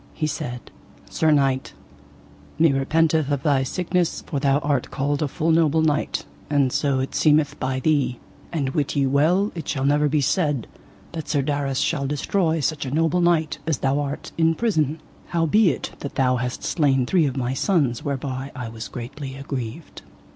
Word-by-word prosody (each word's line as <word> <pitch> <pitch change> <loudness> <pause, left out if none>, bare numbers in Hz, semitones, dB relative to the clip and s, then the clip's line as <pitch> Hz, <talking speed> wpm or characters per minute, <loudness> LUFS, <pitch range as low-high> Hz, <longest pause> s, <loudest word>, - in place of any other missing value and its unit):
He 155 - -1
said: 125 -5 -5 0.4
Sir 160 - +2
knight, 135 -3 +2 0.8
me 160 -1 +5
repenteth 155 +2 +2
of 140 -2 -1
thy 145 -4 +3
sickness 175 +5 -1
for 145 - -2
thou 140 0 +3
art 145 -3 -1
called 145 +2 -1
a 150 - +1
full 160 +3 0
noble 160 -1 +3
knight, 150 -1 0 0.2
and 140 -3 +2
so 140 -2 +1
it 130 - -4
seemeth 150 -1 +3
by 130 0 -1
thee; 135 -4 +1 0.3
and 145 -5 -1
wit 140 +1 -1
ye 140 -1 +2
well 160 +10 +2
it 165 - -7
shall 135 -2 -1
never 145 +1 +3
be 150 +1 +2
said 145 - +1 0.5
that 160 -3 -6
Sir 145 -3 +1
Darras 140 -2 -1
shall 140 -4 -1
destroy 160 +3 0
such 150 +1 -1
a 135 - -4
noble 165 +5 +1
knight 165 -3 +2
as 160 -4 +1
thou 135 +3 +1
art 145 0 -4
in 165 0 +3
prison, 160 - 0 0.3
howbeit 170 +1 +2
that 140 - -6
thou 130 -1 +2
hast 125 0 -4
slain 135 -6 +2
three 165 +1 +3
of 135 0 -4
my 125 0 -1
sons 140 - +1
whereby 135 -1 -3
I 125 -4 -5
was 110 -1 -7
greatly 135 +3 -7
aggrieved. 135 +1 -6
145 Hz, 175 wpm, -23 LUFS, 135-160 Hz, 0.8 s, me